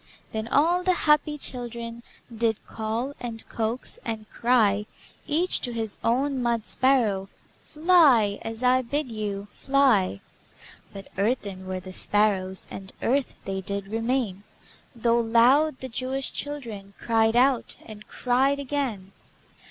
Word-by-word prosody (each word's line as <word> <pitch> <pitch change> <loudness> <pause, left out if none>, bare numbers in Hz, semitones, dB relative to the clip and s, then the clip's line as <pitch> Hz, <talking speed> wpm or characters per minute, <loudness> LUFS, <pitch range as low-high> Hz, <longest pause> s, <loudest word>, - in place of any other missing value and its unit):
Then 220 0 -3
all 335 +8 +3
the 365 0 +2
happy 300 0 +3
children 235 -3 -5 0.3
Did 225 -1 0
call, 225 +5 -3
and 230 -2 -6
coax, 230 +2 -3
and 220 -2 -4
cry 215 -4 +2 0.4
Each 335 +5 +3
to 245 - -1
his 220 -3 -4
own 265 +3 +1
mud 235 -2 0
sparrow: 220 -8 +2 0.3
"Fly, 300 - +4
as 225 +2 -5
I 255 +1 +4
bid 260 +1 -3
you! 205 -2 -4
Fly!" 255 - +2 0.7
But 195 -1 -10
earthen 200 -4 -1
were 185 0 -3
the 185 0 -10
sparrows, 190 -2 +1
And 190 0 -8
earth 270 +2 +1
they 190 0 -3
did 200 +1 -5
remain, 225 -3 -1 0.5
Though 235 0 +2
loud 250 +6 +4
the 260 - -4
Jewish 260 +2 -3
children 225 -9 -6
Cried 225 -1 +2
out, 255 0 +2
and 215 -1 -11
cried 265 +3 +1
again. 260 -9 -3
230 Hz, 130 wpm, -25 LUFS, 210-265 Hz, 0.7 s, Fly